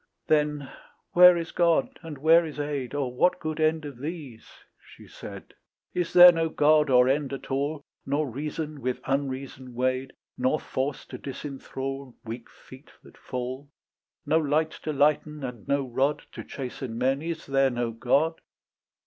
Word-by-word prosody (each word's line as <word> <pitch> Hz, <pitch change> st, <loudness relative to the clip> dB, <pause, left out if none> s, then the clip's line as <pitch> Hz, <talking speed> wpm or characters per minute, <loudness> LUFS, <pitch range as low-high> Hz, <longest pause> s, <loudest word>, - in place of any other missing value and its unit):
Then 150 Hz, -2 st, +1 dB, 0.4 s
"Where 180 Hz, 0 st, +8 dB
is 165 Hz, -1 st, -4 dB
God? 170 Hz, -2 st, +1 dB
and 160 Hz, -4 st, -8 dB
where 160 Hz, +4 st, +5 dB
is 155 Hz, -2 st, -7 dB
aid? 145 Hz, -3 st, -3 dB
Or 135 Hz, -4 st, -2 dB
what 180 Hz, +8 st, +2 dB
good 155 Hz, 0 st, -4 dB
end 155 Hz, 0 st, +1 dB
of 140 Hz, -4 st, -8 dB
these?" 145 Hz, -6 st, -7 dB, 0.3 s
she -, -, -16 dB
said; -, -, -10 dB, 0.4 s
"Is 175 Hz, -2 st, -1 dB
there 180 Hz, 0 st, +10 dB
no 165 Hz, -1 st, 0 dB
God 150 Hz, -1 st, +4 dB
or 125 Hz, -1 st, +6 dB
end 140 Hz, 0 st, 0 dB
at 135 Hz, -, -7 dB
all, 145 Hz, +2 st, -1 dB, 0.2 s
Nor 145 Hz, +2 st, 0 dB
reason 150 Hz, +3 st, -5 dB
with 125 Hz, 0 st, -2 dB
unreason 130 Hz, -2 st, -3 dB
weighed, 130 Hz, +1 st, -1 dB, 0.3 s
Nor 130 Hz, +5 st, +2 dB
force 135 Hz, +2 st, -3 dB
to 125 Hz, -, -9 dB
disenthral 135 Hz, -1 st, -6 dB
Weak 115 Hz, +1 st, -7 dB
feet -, -, -16 dB
that -, -, -17 dB
fall? 130 Hz, +3 st, -6 dB, 0.6 s
"No 160 Hz, -, +3 dB
light 155 Hz, +1 st, +1 dB
to 155 Hz, -, 0 dB
lighten 150 Hz, +1 st, +1 dB
and 125 Hz, -5 st, -7 dB
no 140 Hz, -1 st, 0 dB
rod 135 Hz, +4 st, 0 dB
To -, -, -8 dB
chasten 125 Hz, -3 st, -6 dB
men? 135 Hz, +3 st, +1 dB
Is 165 Hz, 0 st, -5 dB
there 135 Hz, 0 st, +3 dB
no 120 Hz, -2 st, -2 dB
God?" 140 Hz, +8 st, +1 dB
140 Hz, 160 wpm, -26 LUFS, 130-155 Hz, 0.6 s, there